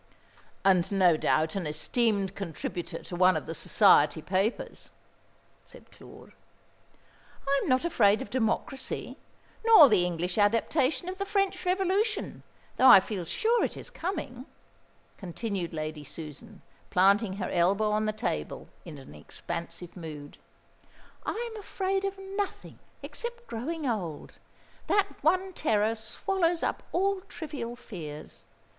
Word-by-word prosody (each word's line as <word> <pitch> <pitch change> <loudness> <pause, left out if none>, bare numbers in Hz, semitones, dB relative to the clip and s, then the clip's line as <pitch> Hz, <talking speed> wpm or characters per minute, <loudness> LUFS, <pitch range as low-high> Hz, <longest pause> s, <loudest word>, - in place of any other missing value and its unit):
"And 190 -1 +4
no 185 -4 +4
doubt 155 +1 +1
an 185 -5 -2
esteemed 195 +5 0
contributor 175 -1 -5
to 175 - -7
one 185 +1 +4
of - - -5
the 165 - -5
Society 150 -1 +4
Papers," 195 +7 -2 0.7
said - - -17
Claude. - - -15 1.2
"I 275 0 +3
am - - -3
not 255 +4 +2
afraid 210 -11 +4
of 205 - -7
Democracy, 255 +2 -2 0.4
nor 440 - +9
the 205 -5 +4
English 175 +2 -2
adaptation 255 +8 +2
of 375 +1 -5
the 395 - -1
French 395 -1 0
Revolution, 390 +4 0 0.4
though 260 - +6
I - - +11
feel 190 -1 -4
sure 455 - +1
it - - -2
is - - -6
coming," 290 -8 -5 0.7
continued 195 -1 -4
Lady 155 -1 -5
Susan, 165 - -10 0.3
planting 195 +2 +3
her 195 0 -4
elbow 195 +5 +2
on 215 +1 +1
the - - +1
table 75 - -4
in 155 -3 -9
an 135 - -12
expansive 170 - -7
mood. 150 -5 -9 0.9
"I 470 +1 -3
am 440 - -7
afraid 390 -1 -2
of 390 0 -3
nothing 390 +1 -5 0.2
except 475 0 -6
growing 300 - -4
old. 180 -10 -4 0.5
That 405 -1 +2
one 370 +4 +2
terror 220 -8 +1
swallows 335 - -1
up - - -1
all 390 +1 +1
trivial 265 -7 -6
fears. 155 -11 -9
215 Hz, 135 wpm, -28 LUFS, -, 1.2 s, I